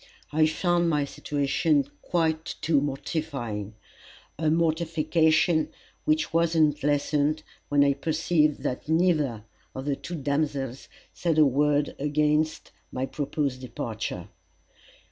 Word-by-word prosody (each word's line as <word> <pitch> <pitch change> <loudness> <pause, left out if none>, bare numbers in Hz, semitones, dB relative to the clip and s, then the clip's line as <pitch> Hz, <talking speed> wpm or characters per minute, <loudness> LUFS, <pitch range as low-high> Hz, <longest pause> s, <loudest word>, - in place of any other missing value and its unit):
I 155 +1 +4
found 175 +1 +1
my 150 -3 +1
situation 145 +1 0
quite 160 -2 -1
too 155 -3 +3
mortifying 135 -7 -4 0.6
a 155 +1 0
mortification 160 0 +2 0.4
which 155 +1 +1
was 165 0 +2
not 150 -2 +3
lessened, 145 +1 +1 0.3
when 145 -1 +4
I 140 0 +4
perceived 155 +1 +1
that 130 - -3
neither 155 - +2 0.3
of 130 - -5
the 145 -1 0
two 175 - -7
damsels 140 -3 -2 0.2
said 165 -3 0
a 155 - +7
word 145 +2 +2
against 150 +2 0 0.2
my 130 +1 -2
proposed 140 -2 -2
departure. 115 -3 -5
150 Hz, 115 wpm, -26 LUFS, 140-160 Hz, 0.6 s, a